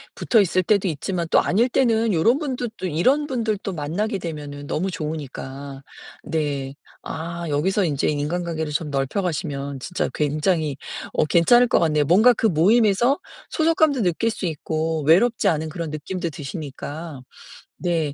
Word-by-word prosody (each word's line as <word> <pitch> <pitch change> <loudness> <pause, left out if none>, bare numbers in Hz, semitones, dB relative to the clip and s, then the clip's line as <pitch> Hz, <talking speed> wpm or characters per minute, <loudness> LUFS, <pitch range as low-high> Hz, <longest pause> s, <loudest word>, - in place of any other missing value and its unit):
붙어있을 195 -6 +3
때도 200 0 +2
있지만 170 +2 -2
또 - - +6
아닐 225 +7 +2
때는 230 -4 +2
요런 225 - +3
분들 255 -6 -3
또 190 - -5
이런 255 - +2
분들도 220 -7 -2
만나게 190 +8 -2
되면은 145 -4 -6
너무 185 +7 -1
좋으니까. 140 -3 -6 0.4
네. 140 -4 -2 0.3
아 170 +2 -5
여기서 185 +8 +1
인제 145 -4 0
인간관계를 160 +1 -2
좀 150 +1 -2
넓혀가시면 140 -2 -2
진짜 180 +8 -2
굉장히 150 0 0 0.4
어 - - +2
괜찮을 240 +11 +5
것 - - +3
같네요. 155 -3 +2
뭔가 215 - +6
그 225 - -2
모임에서 215 - +3 0.3
소속감도 315 -5 +2
느낄 180 +5 +1
수 215 - -4
있고 160 0 -2
외롭지 200 +10 +4
않은 155 0 +1
그런 165 0 -5
느낌도 170 +4 -4
드시니까. 150 0 -7 0.6
네. 165 -5 -1
170 Hz, 325 characters per minute, -22 LUFS, 150-205 Hz, 0.6 s, 또